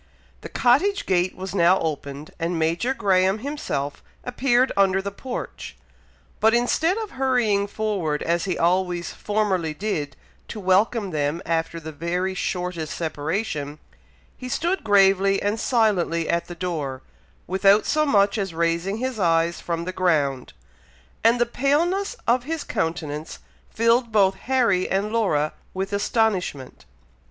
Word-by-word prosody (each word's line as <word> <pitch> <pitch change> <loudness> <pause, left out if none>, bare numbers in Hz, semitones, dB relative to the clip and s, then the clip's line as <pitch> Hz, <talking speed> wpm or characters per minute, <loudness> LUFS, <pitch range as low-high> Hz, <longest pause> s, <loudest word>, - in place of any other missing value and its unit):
The - - -8
cottage 330 +12 +2
gate 185 -1 +1
was 190 0 -6
now 180 0 +4
opened, 145 -2 -4
and 170 +1 -1
Major 165 +10 0
Graham 190 -1 +2
himself 215 - -4 0.2
appeared 250 0 +2
under 195 -1 +3
the 200 +1 -4
porch; 245 +5 -7 0.6
but 220 +1 +4
instead 320 - +1
of 440 -2 -4
hurrying 240 -7 +1
forward, 200 -8 -2
as 170 +1 0
he 185 -3 -2
always 175 0 0
formerly 190 -7 -1
did, 150 -8 -3 0.3
to 215 - -7
welcome 200 +2 +2
them 150 +1 -1
after 165 0 -1
the 160 0 -8
very 175 +5 -2
shortest 180 -3 -3
separation, 155 -1 -3 0.6
he 255 - -8
stood 345 +8 -1
gravely 195 -1 +4
and 205 +2 -1
silently 195 -9 +1
at 170 - 0
the 175 - -8
door, 150 -7 -4 0.4
without 195 +3 +4
so 305 0 +2
much 205 -7 +3
as 190 -4 -3
raising 170 +4 0
his 255 -1 -3
eyes 170 -1 +2
from 170 -1 -3
the 185 - -4
ground; 145 - 0 0.7
and 230 +2 +4
the 240 - +4
paleness 335 - 0
of 245 +1 +2
his 320 0 -3
countenance 160 -2 -3 0.3
filled 230 +1 +2
both 195 -3 +4
Harry 230 -6 +1
and 200 +2 0
Laura 155 -10 +1 0.2
with 195 +1 -3
astonishment. 200 - -1
190 Hz, 140 wpm, -23 LUFS, 170-225 Hz, 0.7 s, now